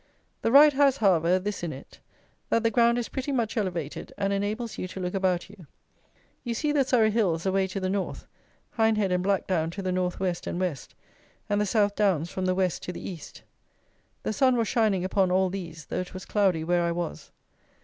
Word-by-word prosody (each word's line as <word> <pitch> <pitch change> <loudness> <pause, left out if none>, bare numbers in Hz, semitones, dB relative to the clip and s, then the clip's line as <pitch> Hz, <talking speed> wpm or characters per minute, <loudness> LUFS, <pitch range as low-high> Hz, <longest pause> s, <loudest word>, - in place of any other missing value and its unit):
The 225 - +1
ride 290 +3 +8
has, 275 -1 +3
however, 180 - +3
this 200 +2 -4
in 170 -2 -3
it: 135 -1 -12 0.5
that 230 - +2
the 230 - +2
ground 235 0 +4
is 240 - -2
pretty 270 +2 -4
much 235 -4 -1
elevated, 175 - -3
and 200 0 0
enables 210 +4 -3
you 185 - -3
to 190 - -8
look 180 -1 -3
about 185 -2 0
you. 195 -5 -15 0.8
You 235 -2 -3
see 300 +5 0
the 290 -2 +3
Surrey 230 -4 +3
hills 185 -7 0
away 190 0 +1
to 190 +1 -4
the 185 - -2
North; 195 0 -3 0.5
Hindhead 215 -3 +2
and 180 0 +1
Blackdown 185 -4 0
to 195 - -5
the 185 - -1
North 180 -1 -1
West 180 -2 -2
and 175 - -3
West; 175 -8 -3 0.5
and 205 0 +1
the 210 - 0
South 205 0 +2
Downs 180 -6 +1
from 185 - -3
the 185 0 +1
West 185 -2 0
to - - -5
the 180 - -7
East. 175 -5 -9 0.8
The - - -1
sun 255 +3 +3
was 230 -2 +1
shining 210 -5 +1
upon 190 0 +2
all 185 0 +2
these, 165 -5 -7
though - - -3
it 185 0 -6
was 185 - -7
cloudy 190 -6 +1
where 175 +1 +1
I 170 0 0
was. 170 - -5
190 Hz, 210 wpm, -27 LUFS, 180-220 Hz, 0.8 s, ride